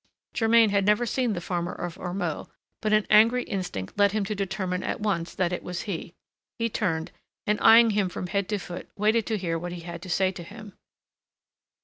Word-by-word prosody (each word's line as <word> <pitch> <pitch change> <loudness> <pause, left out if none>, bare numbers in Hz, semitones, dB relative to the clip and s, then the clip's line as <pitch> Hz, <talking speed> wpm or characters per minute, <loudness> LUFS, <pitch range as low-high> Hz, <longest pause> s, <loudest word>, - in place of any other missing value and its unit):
Germain 225 -1 +4
had 200 -1 +2
never 210 +4 +3
seen 245 -1 0
the 175 - -3
farmer 175 0 -3
of 175 -1 -5
Ormeaux; 175 -3 -3 0.3
but 215 - 0
an 215 -1 +3
angry 230 +4 +6
instinct 180 - -5
led 200 0 +4
him 215 -2 0
to 210 - -2
determine 195 -2 -2
at - - -3
once 195 -6 -2
that 180 -1 0
it - - -3
was 180 -1 -5
he. 175 -4 -5 0.4
He 230 0 0
turned, 165 -7 -2 0.3
and, 210 0 +1
eyeing 230 0 +7
him 200 -3 +1
from 180 - -5
head 200 +1 -2
to 210 - 0
foot, 175 -2 -8
waited 215 +2 +2
to 220 - 0
hear 165 -4 -2
what 175 +1 -5
he 175 - -7
had 170 0 -7
to 185 - -9
say 190 +1 +2
to 185 - -9
him. 205 +3 -11
195 Hz, 210 wpm, -26 LUFS, 175-215 Hz, 0.4 s, eyeing